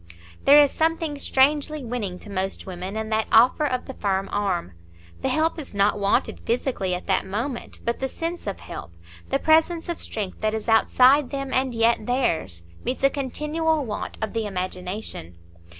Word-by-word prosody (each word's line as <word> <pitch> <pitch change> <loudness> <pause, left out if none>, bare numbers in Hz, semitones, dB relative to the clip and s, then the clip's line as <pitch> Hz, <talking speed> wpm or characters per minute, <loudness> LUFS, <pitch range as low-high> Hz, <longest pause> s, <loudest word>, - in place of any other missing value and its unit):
There 285 +1 +8
is 290 -2 +6
something 320 -2 0
strangely 290 +2 +2
winning 220 -6 -3
to 210 - -10
most 190 0 -2
women 185 +2 -6
in 220 0 -3
that 220 0 0
offer 250 +7 +5
of 255 -2 -2
the 265 - -7
firm 195 -4 -1
arm; 195 - -1 0.5
the - - 0
help 320 +1 +1
is 275 -8 -8
not 200 +1 +2
wanted 200 0 +1
physically 230 -6 -1
at 180 - -7
that - - +1
moment, 230 +7 -4
but 235 - -1
the 265 - -1
sense 330 0 -5
of 200 - -4
help, 85 - -8 0.4
the - - +2
presence 325 +2 +2
of 340 - -3
strength 205 -4 -4
that 215 0 +1
is 220 - -5
outside 255 +4 +5
them 275 -1 -4
and 260 -2 +1
yet 230 -1 +2
theirs, 165 - 0 0.2
meets 260 +2 -3
a 275 - +5
continual 300 +3 -1
want 210 -3 -5
of 220 - -3
the 225 -2 -1
imagination. 185 - -5
235 Hz, 180 wpm, -24 LUFS, 200-285 Hz, 0.5 s, There